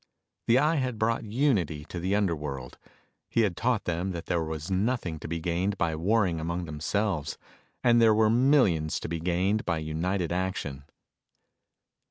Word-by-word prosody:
The 115 - +5
Eye 155 +4 +3
had 130 -4 -1
brought 110 +1 0
unity 105 - 0
to 85 - -6
the 95 +4 0
underworld. 75 -10 -2 0.5
He 115 - +2
had 100 -6 +1
taught 120 +1 0
them 90 +2 -2
that 85 -1 -6
there 85 -2 0
was 80 +2 -5
nothing 95 -4 -1
to - - -7
be 85 +1 -3
gained 90 +4 -1
by 80 -3 0
warring 90 0 +1
among 85 +2 -3
themselves; 80 +1 -2 0.5
and 120 -1 +5
there 110 -2 +6
were 110 0 +4
millions 115 - +3
to - - -4
be 85 0 -3
gained 90 +5 0
by 85 -2 -1
united 85 +3 -2
action. 90 -7 -3
90 Hz, 165 wpm, -28 LUFS, 80-110 Hz, 0.5 s, there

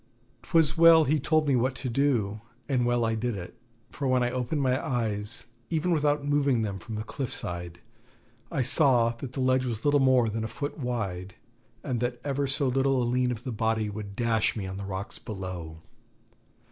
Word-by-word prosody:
'Twas 160 +3 +2
well 165 -1 +7
he 150 +2 +1
told 155 +2 +2
me 140 - +3
what 130 +2 +1
to 130 - -5
do, 115 -5 0 0.3
and 125 -4 +1
well 120 -1 +2
I 115 - +1
did 115 +1 -2
it; 90 -2 -8 0.4
for 140 - -3
when 130 -1 +3
I 120 - 0
opened 130 +4 -1
my 130 0 +1
eyes, 110 -3 -2 0.2
even 170 +2 0
without 150 -2 +1
moving 140 -5 +2
them 100 -2 -3
from 110 +5 -7
the 105 - -3
cliff 130 +2 -5
side, 85 -1 -5 0.7
I 140 -6 0
saw 125 -4 +5
that 130 -1 -7
the - - -5
ledge 130 0 +2
was 115 0 -4
little 145 0 +4
more 130 -3 +4
than 110 +1 -2
a - - -2
foot 145 +8 -5
wide, 100 -8 -3 0.5
and 125 -2 -2
that 120 0 -2
ever 140 0 -1
so 135 +1 +1
little 135 +1 +2
a 120 - +1
lean 125 +1 +1
of 120 -1 -5
the 130 - -4
body 110 -1 0
would 100 -1 -7
dash 115 -2 +1
me 105 -4 -4
on 95 0 -5
the 100 - -5
rocks 95 +2 -5
below. 90 -6 -7
125 Hz, 200 wpm, -27 LUFS, 110-140 Hz, 0.7 s, well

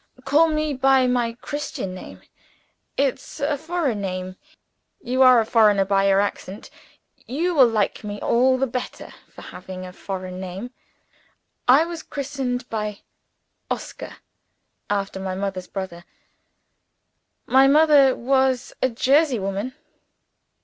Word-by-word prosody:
Call 295 +5 +4
me 305 -1 -1
by 265 0 +3
my 245 -2 0
Christian 290 -10 -5
name. 185 - -11 0.7
It's 275 +2 -2
a 290 +1 0
foreign 290 - -2
name. 185 -1 -4 0.6
You 255 -6 -1
are 255 -2 +8
a 225 - +1
foreigner 210 -4 +4
by 195 0 +2
your 195 0 +4
accent 200 0 -4 0.6
you 335 +8 -1
will 270 -6 +6
like 220 -2 -1
me 205 0 -5
all 255 +2 +3
the 270 - +1
better 250 0 -6 0.2
for - - -13
having 185 0 -9
a 180 - -10
foreign 185 -1 -6
name. 190 +6 -6 1.0
I 270 +6 +6
was 340 -1 -6
christened 265 -4 -4 1.0
'Oscar' - - -6 0.7
after 200 -1 -2
my 190 -1 -4
mother's 190 -1 -4
brother: 190 -3 -6 1.4
my 265 +1 +5
mother 290 -2 +5
was 265 0 +1
a 260 - +3
Jersey 270 +3 +2
woman. 200 +5 -4
245 Hz, 125 wpm, -23 LUFS, 195-270 Hz, 1.4 s, are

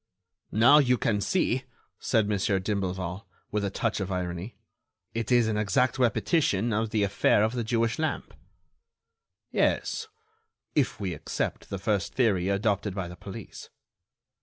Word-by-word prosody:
"Now, 120 +8 +7
you 125 -3 +3
can 105 -3 0
see," - - 0 0.3
said 110 -2 +1
Mon. 105 -1 0
d'Imblevalle, 95 -2 -2 0.2
with 105 -1 -1
a 100 - 0
touch 95 - -1
of 95 -1 -3
irony, 90 +3 -4 0.6
"it 115 +1 -3
is 120 -2 +5
an 110 -1 0
exact 120 +5 +1
repetition 120 - +2
of 110 +1 0
the 105 -2 +1
affair 100 +1 +3
of 110 +2 +1
the 120 -2 -1
Jewish 115 +2 0
lamp." 160 0 -2 1.2
"Yes, 455 - 0 0.7
if 135 -7 +1
we 95 -4 -2
accept 75 - -4
the 100 - -3
first 100 +1 -1
theory 100 -7 +2
adopted 100 -1 0
by 95 -3 -3
the 90 - -9
police." 100 +3 -9
105 Hz, 145 wpm, -27 LUFS, 95-115 Hz, 1.2 s, Now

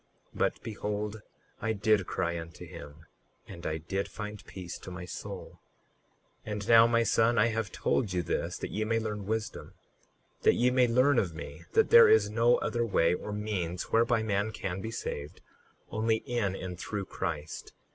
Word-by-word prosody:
But - - 0
behold, 105 0 -4 0.4
I 110 +1 0
did 105 -2 +2
cry 85 0 -1
unto 85 0 -9
him 75 +3 -11 0.4
and 85 - -7
I 80 0 -1
did 95 +5 -3
find 105 -1 -7
peace 90 -2 -7
to - - -9
my 90 0 -7
soul. - - -8 0.9
38:9 - - -4
And 105 -1 -4
now, 115 0 +8
my 115 0 +3
son, 115 +1 +3
I 115 +2 +4
have 110 -3 -2
told 110 -7 0
you 90 -1 0
this - - -2
that - - -5
ye 110 - -1
may 115 +1 +1
learn 105 -3 -3
wisdom, 110 0 -3 0.7
that - - +5
ye 125 +1 +3
may 125 -1 +4
learn 130 +3 +4
of 85 -5 -2
me 80 0 -8
that - - +3
there 115 - +9
is 105 -2 +5
no 115 +2 +4
other 120 -1 -1
way 85 -6 +3
or 105 - -4
means 100 -5 -3
whereby 115 0 +3
man 105 0 0
can 95 -3 -4
be 110 - -4
saved, 75 -7 -5 0.5
only 110 +1 +1
in 110 -6 -1
and 90 -2 -6
through 105 0 -4
Christ. 75 -3 -5
105 Hz, 180 wpm, -30 LUFS, 90-115 Hz, 0.9 s, there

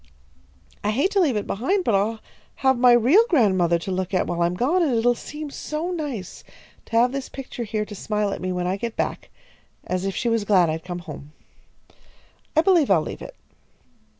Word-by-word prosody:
"I 205 - 0
hate 275 - +1
to 405 - +2
leave 300 - +2
it 210 - -1
behind, 360 - 0
but 230 - +1
I'll 215 +3 0 0.4
have 265 0 +5
my 245 0 +5
real 250 - +6
godmother 190 - +3
to 170 +3 -5
look 185 0 -2
at 185 - +2
while 175 0 -2
I'm 170 +1 +1
gone, 290 - +1
and 290 -8 +2
it'll 240 +2 +3
seem 300 +4 -8
so 310 +5 -4
nice 285 - -5 0.4
to - - -19
have 245 +2 +4
this 275 0 -5
picture 250 -3 -6
here 215 0 -2
to 210 - -10
smile 210 0 -2
at - - -6
me 185 0 -2
when 180 -1 -2
I 185 +2 -1
get 230 +2 -4
back, - - -3 0.6
as 185 0 -2
if 195 0 -2
she 240 - -2
was 230 -2 +1
glad 185 -5 +3
I'd 160 0 -4
come 175 -1 -6
home. 150 -2 -10 1.2
I 315 - +6
believe 340 -5 +3
I'll 170 -5 +4
leave - - -7
it." - - -9
220 Hz, 205 wpm, -23 LUFS, 185-275 Hz, 1.2 s, real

